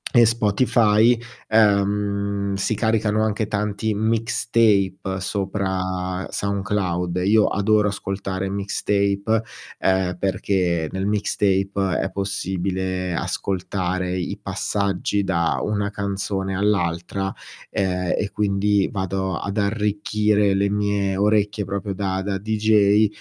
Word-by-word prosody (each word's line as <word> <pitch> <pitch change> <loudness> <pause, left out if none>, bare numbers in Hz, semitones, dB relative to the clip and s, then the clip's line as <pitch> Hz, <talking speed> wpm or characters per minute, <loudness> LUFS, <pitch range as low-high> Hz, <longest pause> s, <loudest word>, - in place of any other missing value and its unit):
e 120 -1 +8
Spotify. 115 0 +3 0.3
Ehm 100 -1 +2
si 100 +3 0
caricano 110 0 +1
anche 110 0 0
tanti 105 0 -1
mixtape 110 -4 +1
sopra 95 -1 -2
Soundcloud. 95 -3 -1
Io 105 +1 +5
adoro 105 +1 +2
ascoltare 95 -1 -3
mixtape, 100 +2 0 0.4
ehm, 95 -1 +1
perché 90 -4 0
nel 95 +1 -2
mixtape 100 -2 0
è - - -2
possibile 95 -2 -2
ascoltare 95 -1 -2
i 90 - -3
passaggi 100 0 -1
da 85 -3 0
una 105 -1 -1
canzone 100 -1 -3
all'altra, 95 -1 0 0.4
ehm, 90 -2 0
e 100 - -2
quindi 100 -1 +1
vado 95 -1 -2
ad 100 +2 -4
arricchire 105 0 +1
le 100 +1 +1
mie 100 -1 0
orecchie, 105 0 +1
proprio 100 0 -3
da 95 -1 -1
da 100 0 -2
DJ 105 0 +3
100 Hz, 105 wpm, -22 LUFS, 95-105 Hz, 0.4 s, e